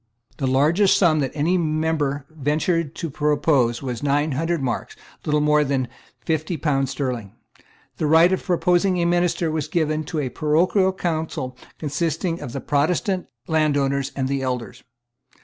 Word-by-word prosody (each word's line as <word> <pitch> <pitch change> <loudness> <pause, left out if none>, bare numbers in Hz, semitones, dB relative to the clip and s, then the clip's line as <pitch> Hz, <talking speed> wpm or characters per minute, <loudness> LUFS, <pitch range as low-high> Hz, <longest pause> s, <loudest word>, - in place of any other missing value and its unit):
The 135 - -1
largest 165 +10 +4
sum 165 -5 +4
that 135 -2 0
any 170 +5 +2
member 155 -3 -1
ventured 155 +2 -1
to 165 - -4
propose 145 -5 +1
was 125 -3 -4
nine 145 +2 +1
hundred 165 +5 -1
marks, 120 -3 -3 0.3
little 150 0 +2
more 150 0 +4
than 135 -3 -1 0.4
fifty 160 +1 -1
pounds 135 -3 0
sterling. 125 -7 -4 0.6
The 155 - 0
right 165 +4 +6
of 190 - -1
proposing 180 +1 +2
a 170 - +1
minister 175 -1 +1
was 155 -3 -2
given 155 -2 0
to 165 +1 -5
a 140 -4 -1
parochial 175 +7 +2
council 160 -8 -3 0.2
consisting 165 +3 -2
of 120 - -6
the 135 - -5
Protestant 180 +6 0 0.2
landowners 140 -3 +1
and 135 -2 -1
the 135 0 -1
elders. 125 -1 -4
150 Hz, 150 wpm, -22 LUFS, 140-165 Hz, 0.6 s, right